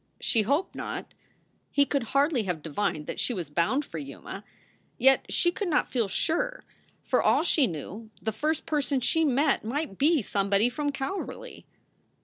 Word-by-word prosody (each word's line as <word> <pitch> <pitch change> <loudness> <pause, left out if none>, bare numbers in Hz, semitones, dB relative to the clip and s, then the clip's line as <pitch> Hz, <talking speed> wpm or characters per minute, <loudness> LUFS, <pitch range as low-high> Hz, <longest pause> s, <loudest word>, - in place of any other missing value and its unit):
She 225 - +2
hoped 285 - 0
not. - - -6 0.6
He 285 - +3
could 275 -3 -1
hardly 280 -3 +3
have 175 -5 -3
divined 155 -1 -2
that - - -5
she 245 - 0
was 170 -6 -5
bound 175 - +1
for 165 - -6
Yuma. 145 +7 -8 0.5
Yet 265 +2 +4
she 345 - +3
could 405 +1 -3
not 305 -4 +1
feel 235 -5 +1
sure. - - -1 0.4
For - - +2
all - - +3
she 300 -6 +4
knew, 200 +7 -7
the 220 - -2
first 305 +8 -1
person 285 -3 0
she 325 +6 +2
met 280 0 +2
might 245 -2 -3
be 300 -2 +4
somebody 200 +3 +2
from 290 +3 -2
Calverly. 275 +8 -5
265 Hz, 165 wpm, -27 LUFS, 200-300 Hz, 0.6 s, Yet